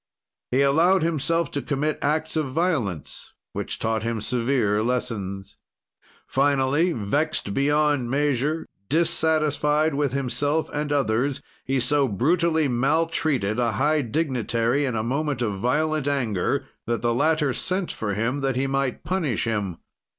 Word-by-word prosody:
"He 130 +2 +3
allowed 165 +6 +4
himself 165 0 0
to 140 - -2
commit 150 +2 -1
acts 155 +2 0
of 155 -3 0
violence 130 - -2 0.2
which - - -4
taught 110 -1 -1
him 115 0 -2
severe 115 -2 +1
lessons. 100 -5 -3 0.7
"Finally, 140 +4 +2
vexed 120 +1 -1
beyond 145 -2 +2
measure, 145 +3 0 0.2
dissatisfied 155 -1 +2
with 140 -2 0
himself 145 +3 0
and 150 0 -2
others, 135 0 +1 0.3
he 135 0 0
so 140 +3 +2
brutally 160 - +2
maltreated 135 -3 +1
a 120 -1 +1
high 150 +3 +2
dignitary 125 -1 0
in 125 -3 -2
a 110 - -1
moment 140 +1 -1
of 105 -4 -2
violent 150 +5 0
anger 120 -10 0 0.2
that 120 0 -1
the 120 0 +2
latter 150 +1 +2
sent 185 +5 -1
for 105 -2 -3
him 120 +7 -1
that 135 -2 0
he 130 +2 0
might 135 -2 -1
punish 160 - -1
him. 105 -7 -2
140 Hz, 135 wpm, -24 LUFS, 120-155 Hz, 0.7 s, allowed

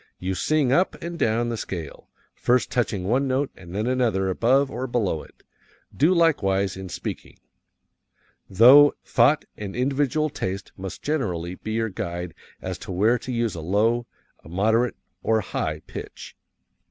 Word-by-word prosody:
You 95 +1 -3
sing 140 - +1
up 175 +7 +2
and 170 0 -6
down 115 +2 +1
the 115 - -3
scale, 85 -7 -7 0.2
first 125 +1 +1
touching 110 -6 0
one 125 +8 +1
note 135 +2 0
and 85 +1 -11
then 105 +2 -1
another 120 -7 +1
above 130 +8 +2
or 125 +3 -3
below 105 -10 -1
it. - - -18 0.5
Do 155 +6 +4
likewise 100 - +2
in 95 -1 -7
speaking. - - -6 1.1
Thought 130 +4 +6
and 100 -2 -6
individual 140 +4 0
taste 95 -6 -4
must 95 -1 -8
generally 90 - -2
be 110 +4 -6
your 115 0 0
guide 85 -2 -5 0.3
as - - -4
to - - -8
where 110 +7 +2
to 130 - -6
use 115 -3 0
a 85 - -6
low, 110 +8 +1 0.4
a - - -13
moderate, 110 +7 +1 0.3
or 110 - +2
a - - 0
high - - -3
pitch. - - -9
115 Hz, 155 wpm, -24 LUFS, 95-130 Hz, 1.1 s, Thought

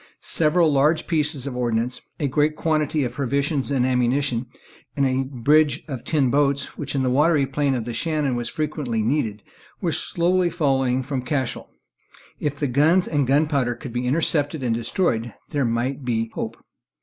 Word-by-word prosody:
Several 160 0 +3
large 150 +4 +3
pieces 150 -4 -1
of 135 -3 -4
ordnance, 120 0 -1 0.2
a 145 - 0
great 150 +3 +1
quantity 155 -2 0
of 125 - -2
provisions 140 +3 -1
and 135 -3 +1
ammunition, 125 0 +1 0.5
and 140 - +3
a 130 0 +1
bridge 145 +3 +2
of 130 -6 -6
tin 140 -6 +1
boats, 140 -1 +1
which 140 -1 -5
in 135 - +1
the 130 - +1
watery 150 +1 +3
plain 135 0 0
of 120 -3 -3
the 120 - -4
Shannon 150 -3 -1
was 120 -1 -3
frequently 145 -7 -2
needed, 110 -5 -1 0.4
were - - -1
slowly 175 +1 +1
following 135 -6 +1
from 135 0 -3
Cashel. 130 -1 -3 0.7
If 145 -1 -2
the 145 - -2
guns 155 +8 +3
and 145 -4 0
gunpowder 140 -3 +2
could 120 -1 -9
be 125 0 -2
intercepted 145 0 0
and 120 -2 +1
destroyed, 115 - -1
there 140 -3 0
might 125 +4 -1
be 115 -2 0
some 115 - -9
hope. - - -4
140 Hz, 175 wpm, -23 LUFS, 125-150 Hz, 0.7 s, Several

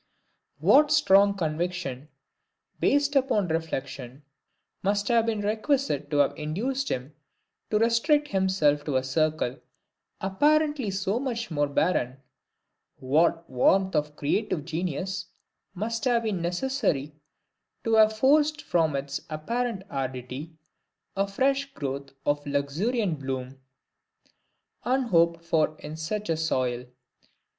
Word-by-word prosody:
What 295 +1 +5
strong 200 -9 +5
conviction, 160 -4 -3 0.7
based 285 0 +2
upon 255 -9 +2
reflection, 140 -4 -4 0.6
must 200 +1 0
have 230 -1 +3
been 220 -2 0
requisite 215 - 0
to 145 - 0
have 145 -1 +3
induced 240 - -2
him 130 +3 -4 0.6
to 210 - +2
restrict 235 +7 +2
himself 185 -7 +2
to 145 - -2
a 130 - +2
circle 145 -1 0 0.6
apparently 295 +5 +2
so 195 +3 -1
much 235 -5 -3
more 145 -2 +1
barren; 140 -4 0 0.8
what 165 +5 +1
warmth 190 +9 +2
of 150 0 -1
creative 155 +1 -1
genius 180 +3 -3 0.5
must 225 +5 -3
have 240 -2 +2
been 205 -6 -1
necessary 175 - -1 0.7
to 225 -3 0
have 220 0 +5
forced 295 +4 +3
from 160 -4 +1
its 140 0 -3
apparent 225 +7 -2
aridity 130 +4 -5 0.6
a 195 0 +1
fresh 275 +6 0
growth 140 -1 -4 0.2
of 145 0 +1
luxuriant 160 - -1
bloom, 130 -1 -5 1.2
unhoped 170 -10 +2
for 155 -2 +1
in 155 - -8
such 205 +7 -4
a 165 - 0
soil! 130 -6 -1
180 Hz, 115 wpm, -26 LUFS, 145-230 Hz, 1.2 s, What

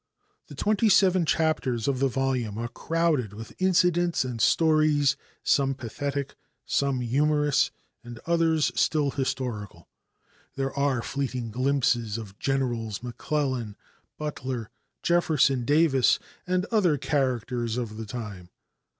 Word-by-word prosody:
The - - -11
twenty 215 +1 +2
seven 185 -3 +4
chapters 145 -9 0
of 135 -2 0
the 135 - +3
volume 130 -5 -1
are 120 +1 -2
crowded 155 - 0
with 110 +1 -9
incidents 175 -4 +2
and 120 -3 -4
stories, 155 0 +3 0.3
some 135 -1 +2
pathetic, 140 +3 -4 0.3
some 140 -2 0
humorous, 145 +4 +2 0.3
and 120 -1 -9
others 165 -2 +2
still 150 -3 +1
historical. 120 - -4 0.7
There 135 0 -2
are 140 -4 0
fleeting 130 -4 -3
glimpses 120 -3 +1
of 100 -3 -9
Generals 120 -6 -1
McClellan, 125 -3 -2 0.4
Butler, 130 -6 -4 0.3
Jefferson 150 -7 +2
Davis 145 -2 +4 0.3
and 185 +1 +1
other 185 -9 +3
characters 125 -4 -1
of 110 -3 -4
the 110 -1 -6
time. 105 -6 -7
135 Hz, 115 wpm, -26 LUFS, 120-155 Hz, 0.7 s, seven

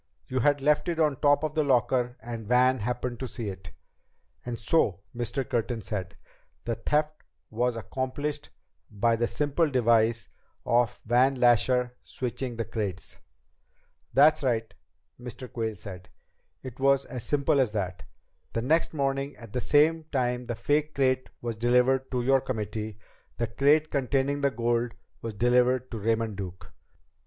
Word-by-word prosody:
You 130 - -1
had 145 +3 +2
left 150 +4 +2
it 165 -1 -2
on 150 -4 +2
top 145 0 +4
of 155 0 -2
your 155 -1 +2
locker 125 -1 +1
and 115 -1 -6
Van 125 +2 +4
happened 120 +2 -3
to 130 - -3
see 115 -3 -5
it." 95 -4 -9 0.7
"And 120 -1 -4
so," 105 - +1
Mr. 120 +2 -2
Curtin 115 -2 -2
said, 95 -3 -5 0.5
"the 115 - -1
theft 150 +6 -1 0.3
was 120 +2 0
accomplished 145 +5 -4 0.4
by 115 +2 +1
the 120 +1 0
simple 150 +4 0
device 115 - +2 0.4
of 120 -1 +1
Van 125 +4 +3
Lasher 125 0 +3
switching 125 0 -4
the 115 0 -3
crates." 105 -5 -5 0.9
"That's 150 +3 +5
right," 115 -4 -1 0.5
Mr. 125 +1 -8
Quayle 110 -2 -3
said, 90 -1 -10 0.5
"it 130 0 -9
was 135 0 +3
as 125 -3 -7
simple 140 -1 +2
as 125 -5 +2
that. 90 -5 -3 0.5
The 115 - -1
next 160 +4 +1
morning, 135 0 -1
at 115 -4 -12
the 125 - -1
same 155 +4 +3
time 125 -4 -1
the 120 - -2
fake 150 +6 0
crate 130 -1 +1
was 120 -1 -2
delivered 125 +3 +2
to 125 -2 -1
your 135 +1 +4
committee, 110 -3 -4 0.4
the 120 - 0
crate 145 +7 +2
containing 140 +1 0
the 140 - +3
gold 120 -1 0 0.3
was 115 -2 -5
delivered 125 +3 +2
to 115 - -4
Raymond 110 -1 0
Duke. 95 -2 -8
125 Hz, 155 wpm, -27 LUFS, 115-135 Hz, 0.9 s, That's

